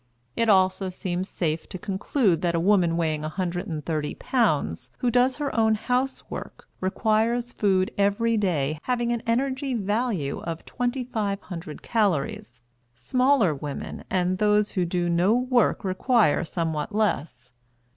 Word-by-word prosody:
It 230 Hz, -1 st, +1 dB
also 190 Hz, -1 st, +3 dB
seems 185 Hz, 0 st, -3 dB
safe 160 Hz, -2 st, -2 dB
to -, -, -6 dB
conclude 195 Hz, -, 0 dB
that 170 Hz, -1 st, +1 dB
a -, -, +2 dB
woman 175 Hz, -2 st, +3 dB
weighing 155 Hz, -3 st, 0 dB
130 160 Hz, -2 st, -3 dB
pounds 155 Hz, -, 0 dB
who 245 Hz, -, 0 dB
does 250 Hz, +2 st, +3 dB
her 290 Hz, -2 st, -3 dB
own 220 Hz, -1 st, +3 dB
housework 250 Hz, +4 st, -3 dB
requires 225 Hz, +5 st, 0 dB
food 190 Hz, -2 st, +1 dB
every 205 Hz, +3 st, +2 dB
day 155 Hz, -8 st, 0 dB
having 240 Hz, -1 st, -1 dB
an 235 Hz, -1 st, -1 dB
energy 260 Hz, +2 st, 0 dB
value 205 Hz, -, -1 dB
of 165 Hz, -1 st, -5 dB
2,500 210 Hz, -, -3 dB
calories; 150 Hz, -, -1 dB, 0.3 s
smaller 250 Hz, -, +2 dB
women 145 Hz, 0 st, -6 dB
and 185 Hz, 0 st, 0 dB
those 210 Hz, 0 st, +3 dB
who 185 Hz, -3 st, 0 dB
do 175 Hz, 0 st, -1 dB
no 175 Hz, +6 st, +3 dB
work 250 Hz, -3 st, +2 dB
require 195 Hz, -, +2 dB
somewhat 165 Hz, +2 st, -3 dB
less. 170 Hz, -11 st, -1 dB
195 Hz, 130 wpm, -25 LUFS, 170-235 Hz, 0.3 s, also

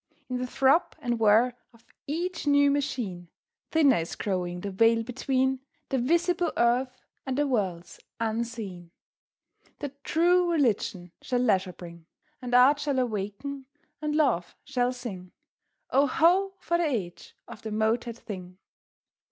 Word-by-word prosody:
In 250 Hz, -, -1 dB
the 250 Hz, 0 st, -3 dB
throb 270 Hz, +6 st, +2 dB
and 240 Hz, -1 st, -2 dB
whir 225 Hz, +3 st, +4 dB, 0.2 s
of 230 Hz, -, -23 dB, 0.2 s
each 330 Hz, +2 st, -3 dB
new 285 Hz, 0 st, +5 dB
machine 240 Hz, -11 st, -2 dB, 0.4 s
Thinner 290 Hz, -6 st, +4 dB
is 165 Hz, 0 st, -3 dB
growing 180 Hz, -3 st, -2 dB
the 200 Hz, -, -4 dB
veil 225 Hz, +3 st, +3 dB
between 260 Hz, +2 st, 0 dB, 0.3 s
The 265 Hz, -, 0 dB
visible 340 Hz, +6 st, +1 dB
earth 250 Hz, +2 st, +1 dB, 0.2 s
and 265 Hz, -1 st, -3 dB
the 290 Hz, -, +2 dB
worlds 190 Hz, -10 st, -2 dB, 0.2 s
unseen. 220 Hz, -6 st, -3 dB, 0.9 s
The 290 Hz, -, -4 dB
True 350 Hz, +2 st, +3 dB
Religion 210 Hz, -, 0 dB
shall 250 Hz, -, -1 dB
leisure 190 Hz, -6 st, +2 dB
bring; 170 Hz, -2 st, -12 dB, 0.3 s
And 245 Hz, -1 st, -1 dB
Art 265 Hz, +4 st, +6 dB
shall 285 Hz, -2 st, -1 dB
awaken 250 Hz, +4 st, -3 dB, 0.3 s
and 300 Hz, -1 st, -1 dB
Love 250 Hz, -, +1 dB
shall 245 Hz, -1 st, 0 dB
sing: 200 Hz, -8 st, -8 dB, 0.6 s
Oh, 275 Hz, +2 st, +4 dB
ho! 375 Hz, +7 st, +3 dB
for 340 Hz, -2 st, -1 dB
the 345 Hz, -, +2 dB
age 205 Hz, -, -4 dB
of 230 Hz, -3 st, -11 dB
the 220 Hz, -, -5 dB
motored 225 Hz, +2 st, 0 dB
thing! 185 Hz, -5 st, -8 dB
245 Hz, 140 wpm, -27 LUFS, 205-285 Hz, 0.9 s, Art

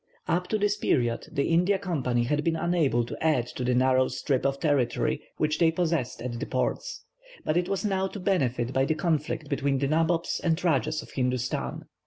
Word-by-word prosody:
Up 180 Hz, +2 st, 0 dB
to 215 Hz, -, 0 dB
this 205 Hz, 0 st, +1 dB
period 120 Hz, -, 0 dB
the 140 Hz, -, 0 dB
India 180 Hz, +4 st, +3 dB
Company 135 Hz, -11 st, -1 dB
had 150 Hz, +5 st, 0 dB
been 165 Hz, 0 st, +1 dB
unable 160 Hz, -9 st, +1 dB
to -, -, -7 dB
add 150 Hz, -7 st, +2 dB
to 125 Hz, -, -5 dB
the 125 Hz, 0 st, +1 dB
narrow 130 Hz, +1 st, +3 dB
strip 135 Hz, +1 st, 0 dB
of 135 Hz, 0 st, -2 dB
territory 145 Hz, -6 st, +1 dB, 0.2 s
which 150 Hz, 0 st, 0 dB
they 165 Hz, -2 st, +5 dB
possessed 160 Hz, -9 st, -1 dB
at 120 Hz, -2 st, -4 dB
the -, -, -3 dB
ports, -, -, -2 dB, 0.4 s
but 155 Hz, -, +1 dB
it 175 Hz, +1 st, +1 dB
was 195 Hz, +2 st, -1 dB
now 190 Hz, -2 st, +1 dB
to 200 Hz, -, -8 dB
benefit 130 Hz, -10 st, 0 dB
by 135 Hz, -, +2 dB
the 155 Hz, -, 0 dB
conflict 155 Hz, -1 st, -1 dB
between 140 Hz, -1 st, 0 dB
the 140 Hz, +1 st, 0 dB
nabobs 165 Hz, +3 st, +1 dB
and 165 Hz, -2 st, +2 dB
rajahs 155 Hz, -2 st, +1 dB
of -, -, -14 dB
Hindustan. 125 Hz, -1 st, -2 dB
150 Hz, 200 wpm, -27 LUFS, 130-175 Hz, 0.4 s, they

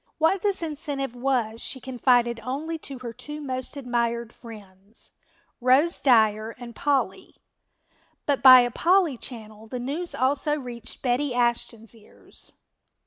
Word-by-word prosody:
What 325 Hz, +4 st, +2 dB
this 395 Hz, -3 st, 0 dB
incentive 285 Hz, -5 st, -3 dB
was 240 Hz, -3 st, -1 dB
she 260 Hz, -, -4 dB
confided 245 Hz, -2 st, +2 dB
only 290 Hz, +8 st, -4 dB
to 275 Hz, -3 st, -7 dB
her 235 Hz, -, -5 dB
two 295 Hz, +6 st, -7 dB
most 260 Hz, -1 st, -5 dB
admired 235 Hz, -3 st, -1 dB
friends, 205 Hz, -2 st, -11 dB, 0.5 s
Rose 265 Hz, +7 st, +3 dB
Dyer 220 Hz, -3 st, +3 dB
and 240 Hz, -2 st, -10 dB
Polly, 265 Hz, -9 st, -1 dB, 0.9 s
but 280 Hz, -4 st, +1 dB
by 255 Hz, -1 st, +10 dB
a 245 Hz, 0 st, 0 dB
Polly 350 Hz, 0 st, +3 dB
channel 220 Hz, -3 st, -10 dB
the 250 Hz, -, -5 dB
news 290 Hz, +8 st, -4 dB
also 285 Hz, +3 st, +1 dB
reached 240 Hz, -3 st, -8 dB
Betty 255 Hz, +1 st, 0 dB
Ashton's 235 Hz, -2 st, -1 dB
ears. 220 Hz, -2 st, -12 dB
250 Hz, 135 wpm, -25 LUFS, 235-285 Hz, 0.9 s, by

